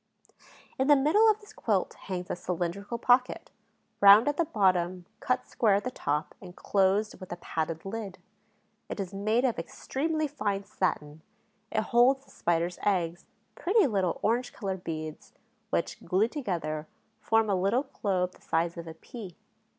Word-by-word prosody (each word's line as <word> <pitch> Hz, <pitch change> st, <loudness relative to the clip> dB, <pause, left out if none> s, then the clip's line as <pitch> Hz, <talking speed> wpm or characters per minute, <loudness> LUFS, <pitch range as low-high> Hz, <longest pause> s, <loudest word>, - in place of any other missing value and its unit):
In 265 Hz, -, +2 dB
the 290 Hz, -, +8 dB
middle 315 Hz, +12 st, +5 dB
of 430 Hz, 0 st, +2 dB
this 420 Hz, 0 st, -16 dB
quilt -, -, 0 dB
hangs 180 Hz, -2 st, -6 dB
a -, -, -1 dB
cylindrical 180 Hz, +5 st, -3 dB
pocket, 250 Hz, +2 st, +2 dB, 0.5 s
round 200 Hz, +4 st, +8 dB
at 290 Hz, -, +1 dB
the 335 Hz, -, +2 dB
bottom, 185 Hz, -, +1 dB
cut 255 Hz, 0 st, 0 dB
square 215 Hz, -4 st, +2 dB
at 200 Hz, -, 0 dB
the 255 Hz, -, -3 dB
top 150 Hz, -7 st, -2 dB
and 180 Hz, -2 st, -11 dB
closed 200 Hz, +2 st, +1 dB
with 185 Hz, -, -10 dB
a -, -, -2 dB
padded 160 Hz, -1 st, -4 dB
lid. 200 Hz, -2 st, -5 dB, 0.7 s
It -, -, -5 dB
is 195 Hz, -1 st, -4 dB
made 215 Hz, +5 st, +1 dB
of 240 Hz, -8 st, 0 dB
extremely 310 Hz, -, -2 dB
fine 205 Hz, -8 st, -2 dB
satin; 155 Hz, -6 st, -2 dB, 0.5 s
it 215 Hz, -, +1 dB
holds 250 Hz, +5 st, +3 dB
the -, -, -20 dB
Spider's 170 Hz, +1 st, -1 dB
eggs, 175 Hz, -4 st, 0 dB, 0.3 s
pretty 405 Hz, +2 st, +3 dB
little 195 Hz, -, 0 dB
orange 240 Hz, +3 st, +1 dB
colored 190 Hz, -3 st, -4 dB
beads, 155 Hz, -1 st, -6 dB, 0.4 s
which, -, -, -2 dB
glued 210 Hz, +6 st, +1 dB
together, 165 Hz, -, -3 dB, 0.3 s
form 225 Hz, 0 st, +2 dB
a 200 Hz, -, +1 dB
little 195 Hz, +8 st, +2 dB, 0.2 s
globe 185 Hz, -3 st, +1 dB
the -, -, -22 dB
size 170 Hz, +1 st, -1 dB
of 170 Hz, 0 st, -7 dB
a 160 Hz, -, -8 dB
pea. 205 Hz, -8 st, -10 dB
200 Hz, 165 wpm, -29 LUFS, 175-245 Hz, 0.7 s, the